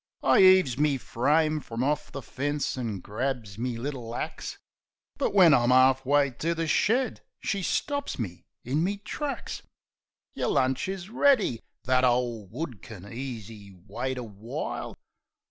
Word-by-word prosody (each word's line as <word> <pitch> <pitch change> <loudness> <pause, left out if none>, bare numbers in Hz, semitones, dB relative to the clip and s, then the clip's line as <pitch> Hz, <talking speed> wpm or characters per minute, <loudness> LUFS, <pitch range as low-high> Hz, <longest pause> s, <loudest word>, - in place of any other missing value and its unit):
I - - +5
'eaves 185 -9 +6
me 145 -2 +3
frame 155 +6 +1
frum 115 -3 -4
orf 150 +2 -1
the 140 - -6
fence, 145 +4 -2
an' 115 -7 -4
grabs 110 -2 -4
me 120 -1 -2
little 120 -2 -5
axe; - - -5 0.6
But, - - +1
when 185 -6 +7
I'm 120 -3 +4
'arf 130 +1 +5
way 140 -1 +4
to 170 +1 0
the 165 0 -1
shed, 230 - +1 0.2
she 200 -2 -2
stops 285 - -1
me 95 -8 -6 0.2
in 140 +6 +1
me 200 +3 0
tracks. 275 +8 -5 0.7
"Yer - - -2
lunch 130 +3 +1
is 190 +1 -5
ready. 240 - +3 0.2
That 130 0 +2
ole 120 -4 +1
wood 125 - -6
kin 100 -1 -10
easy 110 -6 -7
wait 130 +6 -3
a 125 - -4
while." 110 +1 -6
130 Hz, 150 wpm, -27 LUFS, 115-160 Hz, 0.7 s, when